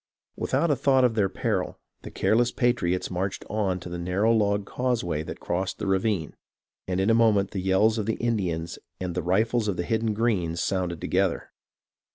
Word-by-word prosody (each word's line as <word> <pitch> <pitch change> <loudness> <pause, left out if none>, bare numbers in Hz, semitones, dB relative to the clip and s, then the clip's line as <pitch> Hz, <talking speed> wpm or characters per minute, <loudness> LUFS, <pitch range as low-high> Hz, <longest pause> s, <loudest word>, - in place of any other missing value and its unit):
Without 170 -2 +1
a - - +3
thought 130 0 +3
of 125 -2 +3
their 105 -3 +1
peril, - - -2 0.2
the - - -8
careless 120 +2 +2
patriots 120 -10 0
marched 95 +2 -3
on 100 -4 0
to 90 - -8
the 90 0 -5
narrow 95 +6 +1
log 100 -2 +1
causeway 110 -11 -1
that - - -7
crossed 95 +2 -2
the - - -4
ravine, 95 -3 0 0.5
and 95 0 -1
in 95 +4 +3
a - - +5
moment 110 -4 +3
the 95 - -3
yells 105 +4 +3
of 105 - -3
the 110 - +1
Indians 90 -8 -2 0.2
and 90 -2 -3
the - - -1
rifles 110 +6 +1
of 100 -3 -1
the 90 - -1
hidden 110 -1 0
Greens 95 -8 0
sounded 90 -3 -1
together. 95 -1 0
100 Hz, 190 wpm, -26 LUFS, 90-115 Hz, 0.5 s, a